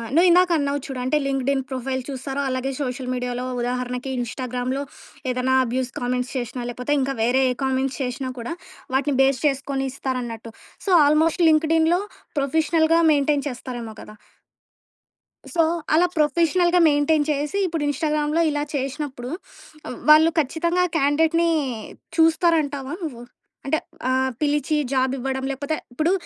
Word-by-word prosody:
నువ్విందాక 360 +1 +5
అన్నావు 285 0 -1
చూడు. 270 -4 -5
అంటే 265 +4 +1
లింక్డిన్ 270 0 0
ప్రొఫైల్ 260 0 -3
చూస్తారు. 270 +1 -4
అలాగే 255 +1 -2
సోషల్ 255 -1 -3
మీడియాలో, 250 0 -3 0.2
ఉదాహరణకి 250 +1 -3
ఇన్‌స్టాగ్రామ్‌లో 250 +2 -3 0.5
ఏదైనా 255 +1 0
అబ్యూజ్ 255 +1 -2
కామెంట్స్ 250 +1 -2
చేషినా, 245 0 -3
లేకపోతే 250 +4 -2
ఇంకా 270 +1 0
వేరే 250 +3 +3
ఏ - - 0
కామెంట్స్ 265 0 0
చేషినా 255 +1 -3
కూడా, 235 +8 -4 0.4
వాటిని 280 0 +1
బేస్ 270 -2 +3
చేసుకొని 270 -1 0
ఇస్తారన్నట్టు. 240 -4 -4 0.3
సో, - - -2 0.2
ఆల్మోస్ట్ 320 +4 +3
లింక్డిన్‌లో 320 +2 +3 0.4
ప్రొఫెషనల్‌గా 320 +3 +2
మెయింటైన్ 290 0 +2
చేస్తారేమో 240 -3 -7
కదా! 215 - -12 1.4
సో 335 - +2 0.3
అలా 345 +3 +5
ప్రొఫెషనల్‌గా 340 +4 +3
మెయింటైన్ 290 +1 +2
చేసి, 295 +7 -2
ఇప్పుడు 325 -3 -2
ఇన్‌స్టాగ్రామ్‌లో 300 +2 0
ఇలా 290 0 -1
చేషినప్పుడు, 270 -2 -4 0.6
ఆహ్, - - -6
వాళ్ళు 310 +2 +8
ఖచ్చితంగా 340 +5 +1
క్యాండిడేట్‌ని 320 +4 +2 0.7
చూస్తారంటావా 315 -4 +2
నువ్వు? 245 -6 -6 0.4
అంటే 310 +3 +1 0.3
ఆహ్, 260 0 +1
పిలిచి 295 0 +1 0.2
జాబివ్వడం 265 0 -1
లేకపోతే, 285 +3 -2 0.2
ఇప్పుడు 315 +6 +1
275 Hz, 125 wpm, -23 LUFS, 255-310 Hz, 1.4 s, వాళ్ళు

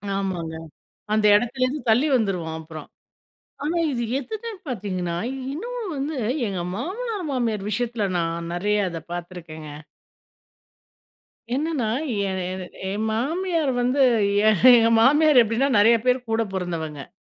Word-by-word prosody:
ஆமாங்க. 180 -5 -3 0.6
அந்த 215 0 +2
இடத்துலேந்து 255 +5 0
தள்ளி 250 +8 +4
வந்துருவோம் 180 -8 -1
அப்புறம். 155 -2 -10 0.8
ஆனா 330 +3 -1
இது 240 -2 -2 0.2
எதுமே 440 - -6 0.2
பாத்தீங்கன்னா 185 -7 -3 0.4
இன்னும் 485 +10 -5 0.2
வந்து, 280 +2 -3 0.3
எங்க 190 -3 -3 0.2
மாமனார் 395 - -4
மாமியார் 225 -6 -1
விஷயத்துல 230 0 -1
நான் 170 0 -2
நறையா 205 +3 +1
இத 165 - -5
பாத்துருக்கேங்க. 170 -3 -7 1.9
என்னன்னா 295 -6 -1 0.4
எ - - -2 0.2
எ 185 -1 -5 0.3
என் 215 +2 -2
மாமியார் 320 +5 0
வந்து, 255 +3 +1 0.5
எ - - +8 0.3
எங்க 230 -1 +5
மாமியார் 295 +2 +6
எப்டின்னா 230 +6 0
நறையா 230 +2 +5
பேர் 250 0 +2
கூட 225 0 +2
பொறந்தவங்க, 160 -6 -4
225 Hz, 120 wpm, -23 LUFS, 180-275 Hz, 1.9 s, எ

